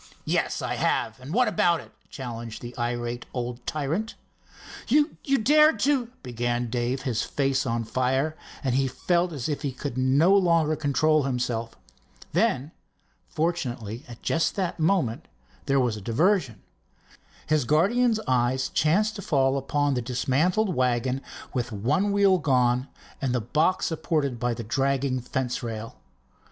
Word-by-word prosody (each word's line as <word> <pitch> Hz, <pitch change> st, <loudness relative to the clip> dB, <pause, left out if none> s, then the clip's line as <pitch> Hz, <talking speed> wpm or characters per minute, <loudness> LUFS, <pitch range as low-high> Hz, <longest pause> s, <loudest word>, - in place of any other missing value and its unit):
"Yes, -, -, 0 dB
I -, -, -2 dB
have. -, -, 0 dB
What 245 Hz, +5 st, +3 dB
about 175 Hz, -6 st, +2 dB
it?" -, -, -13 dB, 0.2 s
challenged 120 Hz, -4 st, -7 dB
the 120 Hz, 0 st, -8 dB
irate 120 Hz, 0 st, -3 dB
old 120 Hz, 0 st, -4 dB
tyrant. 155 Hz, +9 st, -2 dB, 0.7 s
"You 295 Hz, +5 st, +3 dB, 0.3 s
dared 300 Hz, +6 st, +5 dB
to—" 270 Hz, -3 st, +2 dB, 0.2 s
began 120 Hz, -1 st, -2 dB
Dave, 125 Hz, +2 st, -1 dB
his 125 Hz, -6 st, -1 dB
face 135 Hz, -2 st, 0 dB
on 115 Hz, -1 st, -1 dB
fire, 130 Hz, +6 st, 0 dB, 0.3 s
and 130 Hz, -3 st, 0 dB
he 135 Hz, +1 st, +2 dB
felt 175 Hz, +7 st, 0 dB
as 140 Hz, -6 st, -4 dB
if 150 Hz, -2 st, -2 dB
he 140 Hz, -3 st, -2 dB
could 130 Hz, 0 st, -5 dB
no 140 Hz, +9 st, +4 dB
longer 165 Hz, -5 st, +3 dB
control 155 Hz, +1 st, +2 dB
himself. 120 Hz, -3 st, -2 dB, 0.6 s
Then 170 Hz, -, +1 dB, 0.6 s
fortunately 130 Hz, -8 st, -2 dB
at 120 Hz, -1 st, -12 dB
just 165 Hz, -, +1 dB
that 185 Hz, -3 st, -2 dB
moment 160 Hz, -, +1 dB, 0.4 s
there 140 Hz, 0 st, +3 dB
was 120 Hz, -4 st, +1 dB
a -, -, -8 dB
diversion. 135 Hz, -, +1 dB, 0.8 s
His 155 Hz, -2 st, +2 dB
guardian's 215 Hz, -, +3 dB
eye 125 Hz, 0 st, +2 dB, 0.2 s
chanced 210 Hz, +9 st, +2 dB
to -, -, -5 dB
fall 135 Hz, -6 st, +2 dB
upon 145 Hz, +1 st, 0 dB
the 125 Hz, -, -1 dB
dismantled 150 Hz, -, +1 dB
wagon 125 Hz, 0 st, 0 dB, 0.3 s
with 120 Hz, -2 st, -2 dB
one 140 Hz, -, 0 dB
wheel 200 Hz, -2 st, +4 dB
gone 125 Hz, -3 st, +2 dB, 0.3 s
and 130 Hz, -2 st, 0 dB
the -, -, +2 dB
box 155 Hz, -, +1 dB
supported 155 Hz, -6 st, -1 dB
by 120 Hz, 0 st, 0 dB
the 115 Hz, -, -6 dB
dragging 135 Hz, +2 st, 0 dB
fence 125 Hz, +1 st, -2 dB
rail. 115 Hz, -1 st, -6 dB
135 Hz, 145 wpm, -26 LUFS, 120-170 Hz, 0.8 s, dared